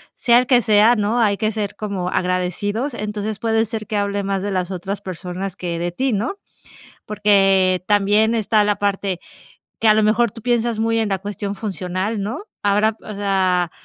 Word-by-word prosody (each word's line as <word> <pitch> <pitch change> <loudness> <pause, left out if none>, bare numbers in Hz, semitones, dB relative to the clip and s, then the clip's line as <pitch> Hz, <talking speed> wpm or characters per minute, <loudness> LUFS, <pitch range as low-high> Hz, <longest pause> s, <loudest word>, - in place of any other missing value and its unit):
sea 240 0 +4
el 250 - -1
que 250 -2 +5
sea, 215 +2 +5
¿no?, 215 +2 0
hay 205 -3 +2
que 215 0 0
ser 210 -2 -4
como 200 -4 -3
agradecidos, 185 - -1
entonces, 210 0 -4
puede 225 0 +1
ser 220 -1 -5
que 215 - -2
hable 200 0 -1
más 195 -1 -1
de 205 - -2
las 185 -1 -2
otras 190 +2 -4
personas 185 +1 -6
que 175 -3 -4
de 175 0 -2
ti, 260 +8 -1
¿no? 235 - -2 0.7
Porque 195 -3 +3
también 210 +2 +3
está 215 0 +2
la 205 0 +1
parte, 195 -2 -1 0.6
que 225 - +2
a 215 - +7
lo 215 - +3
mejor 225 +2 +3
tú 225 - -11
piensas 235 -1 0
muy 225 0 +1
en 220 - 0
la 195 - 0
cuestión 205 0 -5
funcional, 195 +1 -3
¿no? 220 - -4 0.2
Ahora, 210 +2 +2
o 215 - -7
sea, 185 -3 +1
205 Hz, 190 wpm, -20 LUFS, 195-220 Hz, 0.7 s, a